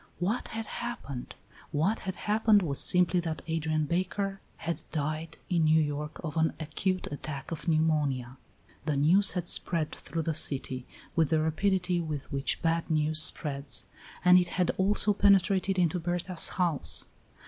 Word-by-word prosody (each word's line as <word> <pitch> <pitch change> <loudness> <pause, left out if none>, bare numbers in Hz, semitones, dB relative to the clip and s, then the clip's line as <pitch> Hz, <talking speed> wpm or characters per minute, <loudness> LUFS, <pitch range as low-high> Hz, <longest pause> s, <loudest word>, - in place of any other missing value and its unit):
What 200 +8 -1
had 225 0 -5
happened? 215 - -6 0.4
What 185 +10 0
had 190 -1 -5
happened 210 -1 +2
was 140 -5 -1
simply 180 0 +4
that 165 -2 -4
Adrian 155 -1 -1
Baker 195 +4 -2 0.2
had 170 0 -4
died 155 +1 -3
in 170 -3 +1
New 155 +1 +4
York 150 0 -3
of 155 -1 -5
an 160 0 +2
acute 185 +4 -2
attack 145 0 -6
of 165 +2 -6
pneumonia. 150 -6 0 0.5
The 150 -2 0
news 180 +8 +5
had 180 -2 -3
spread 165 -3 +1
through 165 +3 -5
the 160 - -1
city 130 -3 -1 0.3
with 160 -3 +2
the 160 - +2
rapidity 180 +3 0
with 150 -4 -5
which 140 +2 -1
bad 165 0 0
news 155 0 +2
spreads, 140 -3 +1 0.4
and 180 0 +8
it 180 - 0
had 180 -2 +2
also 205 +2 +5
penetrated 195 -1 +3
into 180 0 +1
Berta's 175 +1 0
house. 170 -6 -1
165 Hz, 155 wpm, -29 LUFS, 150-185 Hz, 0.5 s, and